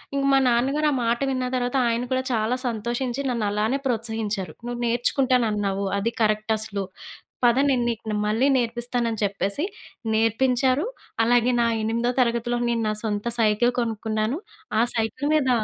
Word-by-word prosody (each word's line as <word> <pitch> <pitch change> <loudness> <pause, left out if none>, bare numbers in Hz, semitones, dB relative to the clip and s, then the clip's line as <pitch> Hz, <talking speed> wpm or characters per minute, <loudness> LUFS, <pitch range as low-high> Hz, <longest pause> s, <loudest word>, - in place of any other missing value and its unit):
ఇంక 275 - 0
మా 270 - +6
నాన్నగారు 270 +6 +2
ఆ - - 0
మాట 235 +1 +1
విన్న 255 -1 -1
తర్వాత 245 +1 -1
ఆయన 230 +1 0
కూడా 260 0 +1
చాలా 225 +2 +1
సంతోషించి 240 +3 -2
నన్నలానే 215 +2 0
ప్రోత్సహించారు. 220 - -2
"నువ్వు 240 0 -4
నేర్చుకుంటానన్నావు 230 -5 +1
అది 225 +4 0
కరెక్ట్ 215 0 +1
అసలు. 200 -2 -3 0.6
పద 240 +1 +4
నేను 250 -3 +2
నీకునే 220 -2 -3
మళ్ళీ 225 +6 +2
నేర్పిస్తానని" 235 -1 -1
చెప్పేసి 200 - -1 0.5
నేర్పించారు. 255 - +2 0.4
అలాగే 245 +1 +3
నా 235 - +3 0.2
ఎనిమిదో 235 +2 0
తరగతిలో 235 0 0
నేను 230 -1 0
నా - - 0
సొంత 210 0 -2
సైకిల్ 225 +3 +3
కొనుక్కున్నాను. 220 +2 -1 0.4
ఆ - - +5
సైకిల్ 230 +6 -1
మీద 270 -4 +2
235 Hz, 140 wpm, -24 LUFS, 215-250 Hz, 0.6 s, మా